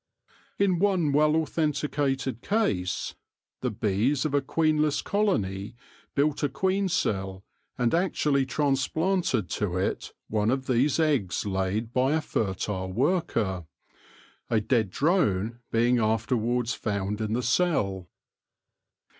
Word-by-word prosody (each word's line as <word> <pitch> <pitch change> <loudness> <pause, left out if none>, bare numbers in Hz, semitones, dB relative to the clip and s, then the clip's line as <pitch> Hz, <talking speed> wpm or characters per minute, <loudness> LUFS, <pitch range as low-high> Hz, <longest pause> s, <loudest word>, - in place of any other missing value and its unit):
In 190 -4 +2
one 185 -6 +2
well 150 +2 +4
authen 160 -1 +1
ticated 135 -4 -2
case, 105 - -1 0.5
the 125 - 0
bees 110 +6 0
of 150 - -1
a 145 - +3
queenless 155 +1 +1
colony 105 - -1 0.4
built 145 +1 +1
a 145 - +1
queen 190 +7 0
cell, 95 - -1 0.3
and 120 -2 +1
actually 150 -6 +1
transplanted 145 - 0
to 90 -2 -1
it 95 - -2 0.2
one 105 0 0
of 130 +1 0
these 130 +5 +2
eggs 140 - +1
laid 100 +4 -2
by 130 +3 +2
a 160 - +1
fertile 95 -6 -2
worker, 115 - 0 0.8
a 115 - +3
dead 110 -1 +1
drone 115 - +1
being 120 +2 +3
after 110 +3 +1
wards 120 +1 0
found 105 0 -2
in 110 0 -1
the 125 +2 0
cell. 115 - 0
125 Hz, 125 wpm, -27 LUFS, 105-155 Hz, 0.8 s, well